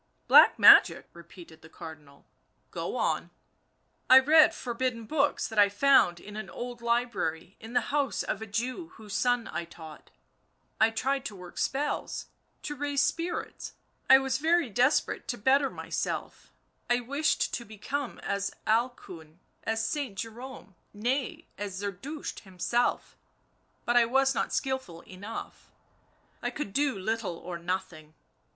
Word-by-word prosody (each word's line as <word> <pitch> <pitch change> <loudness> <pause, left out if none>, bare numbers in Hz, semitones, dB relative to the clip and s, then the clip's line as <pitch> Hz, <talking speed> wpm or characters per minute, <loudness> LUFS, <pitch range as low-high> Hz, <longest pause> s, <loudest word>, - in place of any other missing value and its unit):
" - - -44
Black - - +8
magic," - - +7
repeated 170 -1 -14
the 160 - -15
Cardinal, 155 -4 -12 0.2
" - - -44
go - - -4
on." - - -1 0.4
" - - -44
I 260 - +10
read 305 +4 +6
forbidden 240 -2 -3
books 290 +3 0
that 220 -2 -2
I 205 -1 +6
found 205 -5 +4
in 205 +3 -11
an 215 -3 -6
old 240 +5 -7
library 210 -8 -1
in 225 +2 -10
the 245 - +3
house 285 -2 0
of - - -3
a 220 - -6
Jew 250 - -3
whose 210 -2 -10
son 245 -2 +1
I - - -2
taught— 160 -2 -13 0.7
I 220 - +5
tried 265 +4 -1
to 210 - -5
work 180 -2 -10
spells, 290 +2 -2 0.4
to 295 - -4
raise 285 0 0
spirits; 340 +1 -3 0.4
I 265 - +10
was 265 0 -1
very 325 -4 +2
desperate 255 +8 +1
to 245 - -3
better 270 +5 +3
myself, - - -5 0.4
I 245 0 +3
wished 280 +6 0
to 235 - -3
become 235 +6 -5
as 200 0 -2
Alcuin, 190 -9 -2 0.3
as 225 0 0
Saint 270 -7 -3
Jerome 230 -1 -8 0.2
— - - -43
nay, 245 +5 -2
as 200 -2 -5
Zerdusht 205 +10 -6
himself, 195 +5 -1 0.7
but 240 - +1
I 240 -1 +6
was 270 +3 +2
not - - -1
skilful 260 -11 -3
enough. 200 +5 -9 0.7
I - - -1
could 200 -10 -6
do 280 -4 +1
little 205 -2 -3
or 175 0 -7
nothing. 170 -3 -5
230 Hz, 150 wpm, -28 LUFS, 190-265 Hz, 0.7 s, I